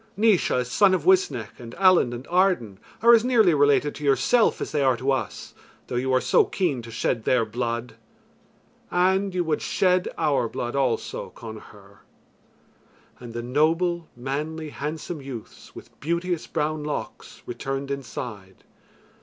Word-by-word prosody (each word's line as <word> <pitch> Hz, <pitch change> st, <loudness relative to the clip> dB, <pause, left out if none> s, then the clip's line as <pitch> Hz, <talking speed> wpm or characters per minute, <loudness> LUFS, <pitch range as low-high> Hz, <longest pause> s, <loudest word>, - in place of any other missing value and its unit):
Naois, 200 Hz, -, +3 dB
son 190 Hz, -, +4 dB
of 170 Hz, -, -3 dB
Uisnech, 130 Hz, -, +2 dB
and 115 Hz, -1 st, -10 dB
Allen 185 Hz, -9 st, +4 dB
and 120 Hz, +2 st, -7 dB
Arden 175 Hz, -, +1 dB, 0.2 s
are 235 Hz, +1 st, +8 dB
as 230 Hz, -1 st, +6 dB
nearly 230 Hz, -8 st, +4 dB
related 145 Hz, 0 st, +3 dB
to 150 Hz, -, -9 dB
yourself 140 Hz, -, +3 dB
as -, -, -4 dB
they 150 Hz, -, 0 dB
are 130 Hz, -3 st, +3 dB
to 130 Hz, +4 st, 0 dB
us, 120 Hz, -7 st, -3 dB, 0.3 s
though -, -, -6 dB
you 130 Hz, +2 st, 0 dB
are 130 Hz, -, +4 dB
so -, -, +4 dB
keen 160 Hz, -10 st, -1 dB
to 115 Hz, -, -11 dB
shed 115 Hz, 0 st, -1 dB
their 125 Hz, -1 st, +2 dB
blood, 120 Hz, +1 st, -3 dB, 1.0 s
and 190 Hz, +2 st, +1 dB
you 180 Hz, -, +1 dB
would 160 Hz, -2 st, -1 dB
shed 185 Hz, -1 st, +1 dB
our 145 Hz, -7 st, +1 dB
blood 120 Hz, +3 st, -4 dB
also, 130 Hz, -5 st, -1 dB
Connachar." 105 Hz, -3 st, -12 dB, 1.2 s
And 120 Hz, -2 st, -9 dB
the 120 Hz, -, -3 dB
noble, 165 Hz, +6 st, +1 dB
manly, 150 Hz, +5 st, -4 dB
handsome 155 Hz, +2 st, -5 dB
youths 130 Hz, -5 st, -10 dB
with -, -, -12 dB
beauteous, 170 Hz, +2 st, -2 dB
brown 150 Hz, 0 st, -2 dB
locks 150 Hz, 0 st, -6 dB
returned 135 Hz, +3 st, -4 dB
inside. 110 Hz, -7 st, -7 dB
140 Hz, 150 wpm, -24 LUFS, 120-175 Hz, 1.2 s, are